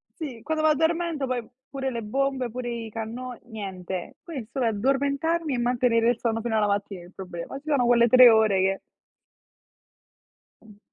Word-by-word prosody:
Sì, 265 Hz, -9 st, -7 dB
quando 315 Hz, 0 st, -1 dB
m'addormento 320 Hz, 0 st, +1 dB
poi 245 Hz, -3 st, -2 dB, 0.2 s
pure 270 Hz, -1 st, -3 dB
le 235 Hz, -1 st, -4 dB
bombe, 265 Hz, +2 st, -1 dB
pure 245 Hz, +1 st, -5 dB
i 230 Hz, -2 st, -5 dB
canno 235 Hz, +3 st, -6 dB
niente. 190 Hz, -5 st, -6 dB
Quindi 295 Hz, -9 st, -6 dB
il 215 Hz, -, -21 dB
solo 260 Hz, -3 st, -1 dB
addormentarmi 280 Hz, +7 st, 0 dB
e -, -, -2 dB
mantenere 240 Hz, -1 st, +2 dB
il 240 Hz, -, 0 dB
sonno 225 Hz, -1 st, -1 dB
fino 230 Hz, -1 st, -2 dB
alla 210 Hz, -1 st, +2 dB
mattina 200 Hz, -3 st, -2 dB
il 180 Hz, -, -16 dB
problema. 180 Hz, +6 st, -7 dB
Ci 295 Hz, -, -29 dB
sono 275 Hz, -5 st, +2 dB
quelle 235 Hz, 0 st, +5 dB
3 255 Hz, +1 st, +9 dB
ore 220 Hz, -4 st, +4 dB
che 195 Hz, 0 st, +1 dB, 1.8 s
Mh. 210 Hz, -2 st, -18 dB
240 Hz, 170 wpm, -25 LUFS, 220-275 Hz, 1.8 s, 3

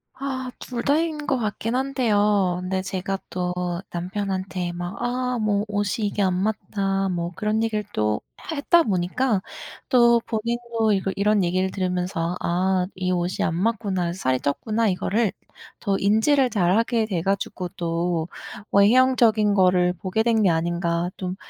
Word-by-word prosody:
아 260 Hz, -2 st, -4 dB
2 240 Hz, -2 st, -5 dB
다인 300 Hz, +1 st, 0 dB
것 270 Hz, -, +1 dB
같긴 220 Hz, +1 st, -2 dB
한데요. 210 Hz, -8 st, +1 dB
근데 185 Hz, +1 st, -2 dB
제가 195 Hz, 0 st, -3 dB
또 180 Hz, -1 st, -2 dB, 0.4 s
남편한테 185 Hz, 0 st, -3 dB
막 175 Hz, +2 st, -5 dB
"아 250 Hz, 0 st, -1 dB
뭐 210 Hz, -1 st, +1 dB
옷이 205 Hz, +1 st, -1 dB
이게 205 Hz, 0 st, -1 dB
안 185 Hz, -2 st, +2 dB
맞다." 195 Hz, -2 st, -1 dB
뭐 175 Hz, -1 st, -2 dB
그런 215 Hz, +3 st, 0 dB
얘기를 215 Hz, -2 st, -1 dB
또 105 Hz, 0 st, 0 dB, 0.3 s
해 320 Hz, -, -3 dB
했다 335 Hz, +4 st, +4 dB
보니까 200 Hz, -, 0 dB, 0.5 s
또 235 Hz, -2 st, +5 dB
본인도 230 Hz, 0 st, -1 dB
이걸 195 Hz, -1 st, -1 dB
이런 205 Hz, 0 st, +2 dB
얘기를 185 Hz, +2 st, 0 dB
들으면서 180 Hz, -2 st, -2 dB
"아 185 Hz, +1 st, +1 dB
이 185 Hz, 0 st, -1 dB
옷이 180 Hz, 0 st, -1 dB
안 165 Hz, -, 0 dB
맞구나. 190 Hz, -3 st, -1 dB
살이 130 Hz, -8 st, 0 dB
쪘구나." 220 Hz, -, 0 dB
이거를 205 Hz, +3 st, 0 dB, 0.5 s
더 195 Hz, -1 st, 0 dB
인지를 235 Hz, +7 st, +3 dB
잘 190 Hz, -2 st, +2 dB
하게 230 Hz, 0 st, +1 dB
돼 185 Hz, -6 st, -1 dB
가지고 195 Hz, -2 st, -2 dB
또 170 Hz, -2 st, -1 dB, 0.4 s
외형적인 220 Hz, 0 st, +4 dB
거를 180 Hz, -2 st, +4 dB
보게 185 Hz, +4 st, -2 dB
된 225 Hz, -2 st, +2 dB
게 190 Hz, -, +5 dB
아닌가 170 Hz, +1 st, 0 dB
좀 185 Hz, -1 st, -4 dB
200 Hz, 275 characters per minute, -23 LUFS, 180-225 Hz, 0.5 s, 또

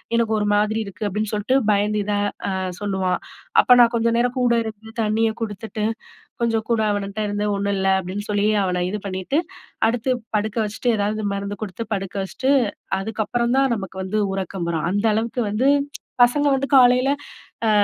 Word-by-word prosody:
"எனக்கு 230 Hz, -1 st, +1 dB
ஒரு 210 Hz, -, 0 dB
மாதிரி 210 Hz, +2 st, +2 dB
இருக்கு." 200 Hz, +1 st, -6 dB
அப்படீன்னு 210 Hz, +2 st, -2 dB
சொல்ட்டு 210 Hz, +6 st, +1 dB
பயந்து 210 Hz, +1 st, +1 dB
இத 205 Hz, +1 st, -2 dB, 0.4 s
அ -, -, -1 dB, 0.3 s
சொல்லுவான். 190 Hz, -3 st, -1 dB, 0.4 s
அப்ப 250 Hz, -, +6 dB
நா 235 Hz, -, +8 dB
கொஞ்ச 230 Hz, 0 st, +2 dB
நேரம் 245 Hz, +2 st, +1 dB
கூட 245 Hz, -2 st, +3 dB
இருந்து, 220 Hz, 0 st, -8 dB
தண்ணிய 220 Hz, +1 st, +2 dB
குடுத்துட்டு, 215 Hz, 0 st, -4 dB, 0.6 s
கொஞ்சம் 225 Hz, -2 st, 0 dB
கூட 230 Hz, -2 st, +2 dB
அவனட்ட 200 Hz, +1 st, -3 dB
இருந்து, 205 Hz, 0 st, -1 dB
"ஒண்ணும் 200 Hz, 0 st, -1 dB
இல்ல." 190 Hz, 0 st, +1 dB
அப்படீன்னு 190 Hz, +3 st, -6 dB
சொல்லி, 205 Hz, 0 st, +1 dB, 0.2 s
அவன 180 Hz, -1 st, 0 dB
இது 210 Hz, +1 st, -3 dB
பண்ணீட்டு, 190 Hz, -, -1 dB, 0.5 s
அடுத்து 245 Hz, +2 st, 0 dB, 0.2 s
படுக்க 215 Hz, +1 st, -2 dB
வச்சுட்டு, 220 Hz, +4 st, -1 dB
எதாவது 210 Hz, +1 st, -1 dB
மருந்து 200 Hz, 0 st, -5 dB
குடுத்து 205 Hz, +3 st, -6 dB
படுக்க 195 Hz, 0 st, -5 dB
வச்சுட்டு, 260 Hz, +7 st, 0 dB, 0.5 s
அதுக்கப்புறம் 225 Hz, +4 st, -1 dB
தான் 270 Hz, -2 st, +3 dB
நமக்கு 190 Hz, -2 st, -7 dB
வந்து 210 Hz, +3 st, -1 dB
உறக்கம் 190 Hz, -2 st, -3 dB
வரும். 160 Hz, -1 st, -1 dB
அந்த 205 Hz, +2 st, 0 dB
அளவுக்கு 230 Hz, +3 st, -1 dB
வந்து, 240 Hz, +7 st, +2 dB, 0.5 s
பசங்க 285 Hz, +5 st, +4 dB
வந்து 270 Hz, +1 st, 0 dB
காலையில 250 Hz, +1 st, +6 dB, 0.6 s
அ -, -, +4 dB
210 Hz, 170 wpm, -22 LUFS, 200-235 Hz, 0.6 s, நா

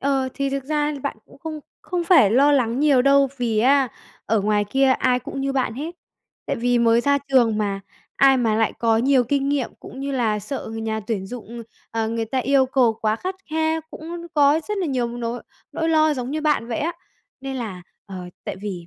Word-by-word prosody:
Ờ, 270 Hz, -1 st, 0 dB
thì 275 Hz, 0 st, -1 dB
thực 275 Hz, -1 st, -3 dB
ra 300 Hz, 0 st, 0 dB
bạn 280 Hz, -, -3 dB
cũng -, -, -18 dB
không 310 Hz, +1 st, -6 dB, 0.2 s
không 355 Hz, -2 st, -2 dB
phải 330 Hz, -, +6 dB
lo 280 Hz, +5 st, +5 dB
lắng 250 Hz, -1 st, +1 dB
nhiều 280 Hz, -4 st, +4 dB
đâu, 275 Hz, 0 st, +4 dB
vì 230 Hz, -3 st, 0 dB
á 270 Hz, +3 st, +4 dB, 0.4 s
ở 220 Hz, -1 st, +2 dB
ngoài 205 Hz, 0 st, +1 dB
kia 270 Hz, +6 st, +2 dB
ai 250 Hz, -1 st, +2 dB
cũng 270 Hz, +2 st, -6 dB
như 275 Hz, 0 st, -1 dB
bạn 260 Hz, -4 st, -1 dB
hết. 315 Hz, +6 st, -5 dB, 0.5 s
Tại -, -, -1 dB
vì 245 Hz, +1 st, +1 dB
mới 230 Hz, 0 st, +4 dB
ra 280 Hz, +2 st, +2 dB
trường 235 Hz, -5 st, +3 dB
mà 200 Hz, -2 st, -1 dB, 0.4 s
ai 270 Hz, -1 st, +6 dB
mà 225 Hz, -3 st, +1 dB
lại 225 Hz, -1 st, +1 dB
có 225 Hz, -1 st, +2 dB
nhiều 260 Hz, 0 st, +3 dB
kinh 275 Hz, +2 st, 0 dB
nghiệm 280 Hz, -3 st, 0 dB
cũng 265 Hz, -, -10 dB
như 275 Hz, 0 st, -3 dB
là 225 Hz, -5 st, +1 dB
sợ 225 Hz, +4 st, -5 dB
người 225 Hz, 0 st, -5 dB
nhà 220 Hz, 0 st, -2 dB
tuyển 205 Hz, -2 st, -3 dB
dụng, 235 Hz, 0 st, -8 dB, 0.3 s
ờ, 225 Hz, -1 st, -1 dB
người 230 Hz, 0 st, -2 dB
ta 260 Hz, +4 st, -2 dB
yêu 265 Hz, +2 st, +3 dB
cầu 255 Hz, -3 st, +3 dB
quá 215 Hz, 0 st, +1 dB
khắt 370 Hz, +9 st, -4 dB, 0.2 s
khe, 320 Hz, 0 st, 0 dB
cũng 340 Hz, +2 st, -8 dB
có 290 Hz, +1 st, +4 dB
rất 420 Hz, -, -2 dB
là 365 Hz, -, -1 dB
nhiều 250 Hz, -4 st, -1 dB
nỗi 235 Hz, 0 st, -4 dB, 0.3 s
nỗi 325 Hz, 0 st, -1 dB
lo 310 Hz, -1 st, +3 dB
giống 250 Hz, 0 st, -4 dB
như 310 Hz, +1 st, -2 dB
bạn 295 Hz, -6 st, +1 dB
vậy 230 Hz, -, -2 dB
á. 335 Hz, +3 st, -1 dB, 0.5 s
Nên 270 Hz, 0 st, -5 dB
là, 205 Hz, -7 st, -5 dB, 0.2 s
ờ, 195 Hz, -, -8 dB, 0.3 s
tại -, -, -4 dB
vì 190 Hz, -4 st, -6 dB
260 Hz, 225 wpm, -22 LUFS, 225-280 Hz, 0.5 s, phải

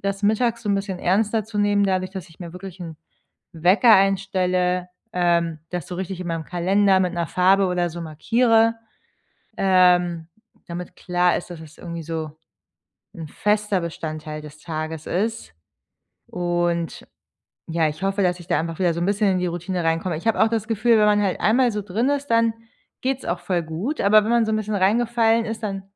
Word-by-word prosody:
das 195 Hz, +1 st, -3 dB
mittags 230 Hz, +3 st, +1 dB
so 210 Hz, -, -4 dB
'n 200 Hz, -, +3 dB
bisschen 195 Hz, -2 st, -3 dB
ernster 210 Hz, +4 st, +1 dB
zu 215 Hz, -1 st, -6 dB
nehmen, 205 Hz, 0 st, +3 dB
dadurch, 185 Hz, -1 st, 0 dB
dass 190 Hz, -2 st, -8 dB
ich 165 Hz, -, -21 dB
mir 170 Hz, -2 st, -8 dB
wirklich 180 Hz, 0 st, -10 dB
'n 165 Hz, -3 st, -7 dB, 0.6 s
Wecker 185 Hz, +8 st, +5 dB
einstelle, 185 Hz, -2 st, +1 dB, 0.2 s
ähm, 170 Hz, -2 st, +1 dB
das 180 Hz, 0 st, -4 dB
so 180 Hz, -, -5 dB
richtig 190 Hz, 0 st, -5 dB
in 180 Hz, -, -5 dB
meinem 165 Hz, -1 st, -3 dB
Kalender 190 Hz, +3 st, +2 dB
mit 180 Hz, -1 st, 0 dB
'ner 170 Hz, -1 st, -1 dB
Farbe 190 Hz, +3 st, +3 dB
oder 175 Hz, -1 st, 0 dB
so 170 Hz, +2 st, -7 dB
markiere, 225 Hz, +8 st, +2 dB, 0.8 s
ähm, 180 Hz, -3 st, +3 dB, 0.4 s
damit 175 Hz, 0 st, -7 dB
klar 180 Hz, -1 st, +1 dB
ist, 175 Hz, -, -6 dB
dass 170 Hz, -2 st, -8 dB
es 155 Hz, -1 st, -13 dB
irgendwie 170 Hz, -1 st, -6 dB
so 160 Hz, -1 st, -4 dB, 0.9 s
'n 160 Hz, -2 st, -7 dB
fester 210 Hz, +2 st, 0 dB
Bestandteil 155 Hz, -2 st, -6 dB
des 150 Hz, 0 st, -12 dB
Tages 155 Hz, -1 st, -5 dB
ist 220 Hz, -, -2 dB, 0.8 s
und, 175 Hz, -1 st, -2 dB, 0.6 s
ja, 165 Hz, -1 st, +1 dB
ich 155 Hz, +4 st, -7 dB
hoffe, 195 Hz, +1 st, 0 dB
dass 180 Hz, -1 st, +1 dB
ich 170 Hz, -, -12 dB
da -, -, +2 dB
einfach 165 Hz, 0 st, -5 dB
wieder 175 Hz, -3 st, +1 dB
so 170 Hz, -, -3 dB
'n 175 Hz, -, 0 dB
bisschen 205 Hz, 0 st, +2 dB
in 185 Hz, -, 0 dB
die 180 Hz, -, -1 dB
Routine 175 Hz, +1 st, -3 dB
reinkomme. 165 Hz, +1 st, 0 dB
Ich 165 Hz, -, -9 dB
habe 225 Hz, -, +1 dB
auch 220 Hz, -, +5 dB
das 225 Hz, -1 st, -2 dB
Gefühl, 225 Hz, +1 st, +3 dB
wenn 210 Hz, -, +4 dB
man 210 Hz, 0 st, +3 dB
halt 190 Hz, -2 st, -1 dB
einmal 240 Hz, +2 st, +3 dB
so 210 Hz, -1 st, -3 dB
drin 215 Hz, +7 st, -1 dB
ist, 285 Hz, 0 st, -2 dB
dann 230 Hz, -1 st, +3 dB, 0.5 s
geht's 265 Hz, 0 st, -2 dB
auch 175 Hz, +1 st, -2 dB
voll 175 Hz, -1 st, -1 dB
gut, 175 Hz, -, -4 dB
aber 210 Hz, +1 st, +5 dB
wenn 225 Hz, -, -1 dB
man 235 Hz, -2 st, +3 dB
so 220 Hz, -, -1 dB
'n 215 Hz, -, +2 dB
bisschen 215 Hz, 0 st, -3 dB
reingefallen 225 Hz, +3 st, +2 dB
ist, 220 Hz, 0 st, -5 dB
dann 195 Hz, -2 st, -3 dB
185 Hz, 195 wpm, -22 LUFS, 170-210 Hz, 0.9 s, Wecker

